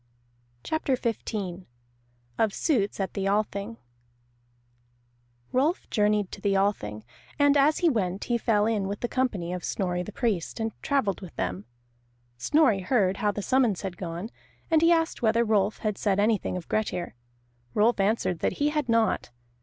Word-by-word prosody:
CHAPTER 315 -4 0
XV 200 -6 -3 0.7
OF 220 -2 +2
SUITS 220 - 0
AT 195 - -2
THE 195 -1 -1
ALTHING 205 +2 -1 1.7
Rolf 290 +8 +1
journeyed 210 -2 +2
to 200 - -8
the 200 -1 +1
Althing, 110 - -1 0.3
and 285 0 +4
as 290 +2 +4
he - - +7
went 195 -5 -1
he 240 -1 0
fell 210 -2 +2
in 215 -3 0
with 200 +1 -4
the 240 - 0
company 210 -10 -1
of 180 - -5
Snorri 180 -3 -1
the 195 - -6
Priest, 215 -5 -2
and 225 0 -1
travelled 245 -10 0
with 185 -4 -10
them. 95 +3 -3 0.7
Snorri 290 - +3
heard 190 -1 +1
how 210 -1 +1
the 205 0 -5
summons 245 -7 +2
had 190 -2 -4
gone, 175 +5 -5 0.4
and 320 -1 +5
he 335 +1 +5
asked 325 -1 +1
whether 230 0 +3
Rolf 210 -1 +2
had 210 -2 -3
said 200 -2 +1
anything 210 -3 +1
of 175 - -8
Grettir. 185 -5 -2 0.6
Rolf 220 +1 +3
answered 195 -4 +1
that - - 0
he 290 +1 +1
had 300 -4 -2
not. 230 -1 +2
210 Hz, 160 wpm, -27 LUFS, 195-240 Hz, 1.7 s, he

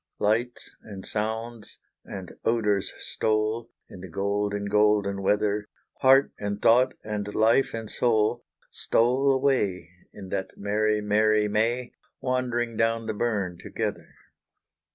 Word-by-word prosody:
Lights 115 +4 0
and 100 -3 -9
sounds 110 0 -3 0.3
and 95 -2 -8
odours 105 -4 +1
stole, 110 +1 -1 0.2
In 90 - -11
the 95 - -9
golden, 100 +3 -1
golden 105 -1 +2
weather 105 +1 +1 0.3
Heart 135 +1 +5
and 100 0 -3
thought, 125 +4 +4
and 105 -1 -3
life 115 +4 +3
and 115 -1 -5
soul, 115 +1 +1 0.3
Stole 130 +4 +2
away, 115 - 0 0.2
In 95 -2 -10
that 95 - -4
merry, 105 +1 +1
merry 105 0 +3
May, 115 +4 0 0.3
Wandering 120 -3 -1
down 115 0 +1
the 110 - -2
burn 100 -5 -2
together. - - -5
110 Hz, 120 wpm, -26 LUFS, 105-115 Hz, 0.3 s, Heart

